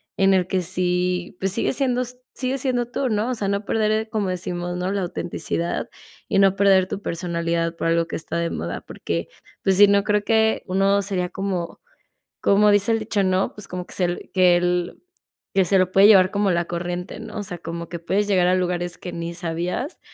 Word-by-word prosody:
en 195 0 +4
el 180 - +2
que 190 -1 0
sí, 180 0 -1
pues, 195 0 0
sigue 230 - 0
siendo 250 -2 +1
s 250 0 -6 0.2
sigues 260 0 -2
siendo 245 -3 0
tú, 260 +1 -2
¿no? 215 +3 0
O 255 - -1
sea, 205 -3 -2
no 200 +1 -1
perder, 220 +1 0
como 210 -4 -1
decimos, 175 -1 -3
no 180 +2 -2
la 200 - -1
autenticidad 170 -1 -3 0.4
y - - +2
no 195 -1 +5
perder 190 -2 +4
tu 195 - -4
personalidad 170 -2 -2
por 165 - -2
algo 165 0 +2
que - - -5
está 165 +1 -4
de 170 0 0
moda, 85 +2 -4
porque, 85 0 -4 0.4
pues, 190 -1 +2
sí 205 0 +8
no 200 0 +3
creo 210 -1 +1
que 220 0 +2
uno 195 +2 +2
sería 185 -3 -2
como 190 -3 -4 0.6
como 210 +1 +4
dice 205 +2 +3
el 225 - +2
dicho, 215 -2 -1
¿no? 185 0 +1
Pues, 210 -2 -10
como 180 0 -5
que - - -8
se 175 -1 -2
que 180 -1 +3 0.6
que 190 -2 +3
se 195 +2 +3
lo 185 0 +1
puede 195 +1 +7
llevar 190 -3 +7
como 200 -1 +1
la 170 -1 +1
corriente, 175 +2 -5
¿no? - - -9
O 205 - -2
sea, 180 -3 -6
como 170 0 -6
que 170 - -4
puedes 195 +5 0
llegar 185 -3 +3
a 185 - +4
lugares 175 -1 -1
que 180 - -8
ni 170 0 -5
sabías 175 - -3
185 Hz, 210 wpm, -22 LUFS, 175-205 Hz, 0.6 s, sí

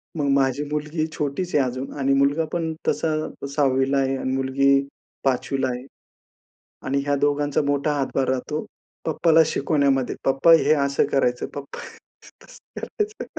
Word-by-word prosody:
मग 145 -3 -1
माझी 135 +1 +1
मुलगी 150 +1 -2
छोटीच 150 +5 -2
आहे 145 - +4
अजून 130 +2 -4
आणि 135 0 +2
मुलगा 140 +4 +2
पण 165 -2 -1
तसा 160 -1 +1 0.3
6वीला 135 -1 +1
आहे 135 0 +1
आणि 130 - -3
मुलगी 135 +1 +2 0.4
5वीला 135 0 0
आहे. 125 +1 -5 1.0
आणि 140 +1 0
ह्या 145 0 +1
दोघांचा 145 0 +1
मोठा 145 +1 0
हातभार 135 -1 -1
राहतो 130 +4 -2 0.4
पप्पाला 160 0 +3
शिकवण्यामध्ये, 140 -4 +1
पप्पा 135 +5 +4
हे 160 - +5
असं 140 -2 +1
करायचं, 125 -2 +1
पप्पा 140 -1 -7 0.6
तसं - - -13
करायचं. 425 -1 -4
140 Hz, 140 wpm, -23 LUFS, 135-150 Hz, 1.0 s, हे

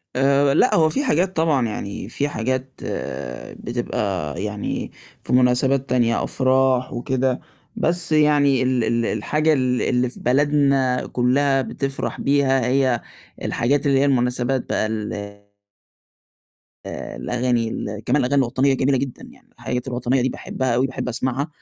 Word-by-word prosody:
آآ 140 +1 +3
لأ، - - +4
هو 160 -1 +4
في 280 - -1
حاجات 190 - +1
طبعًا، 155 -7 +2
يعني 100 -2 -5
في 145 +4 -2
حاجات 130 +1 -2 0.9
بتبقى 95 -8 -3
يعني 105 -1 -4 0.3
في - - -3
مناسبات 130 +2 +3
تانية 120 -2 +2
أفراح 130 -1 +1
وكده، 130 +1 -1 0.4
بس 170 0 0
يعني 145 -3 +4
ال 130 -2 +1
ال 115 +1 0
الحاجة 150 +10 +1
ال 125 -2 +1
اللي 125 0 +1
في - - -11
بلدنا 135 -1 +2
كُلها 135 +2 +2
بتفرح 135 +1 -4
بيها 135 -2 +2
هي 130 -1 +2 0.4
الحاجات 140 +5 0
اللي 135 -1 +3
هي 140 - +3
المناسبات 125 -1 0
بقى - - +1
ال 110 -1 -3 1.7
آآ - - -6
الأغاني 125 -2 0
ال 105 -2 -5
كمان - - +2
الأغاني 135 +3 +2
الوطنية 130 +2 +1
جميلة 135 0 +1
جدًا 135 -2 -4
يعني، - - -21
الحاجات 125 +1 -4
الوطنية 125 +1 0
دي 130 - +1
باحبها 130 -1 -2
أوي 125 +3 +2
باحب 135 -1 -5
أسمعها. 130 +4 -2
130 Hz, 140 wpm, -22 LUFS, 125-140 Hz, 1.7 s, لأ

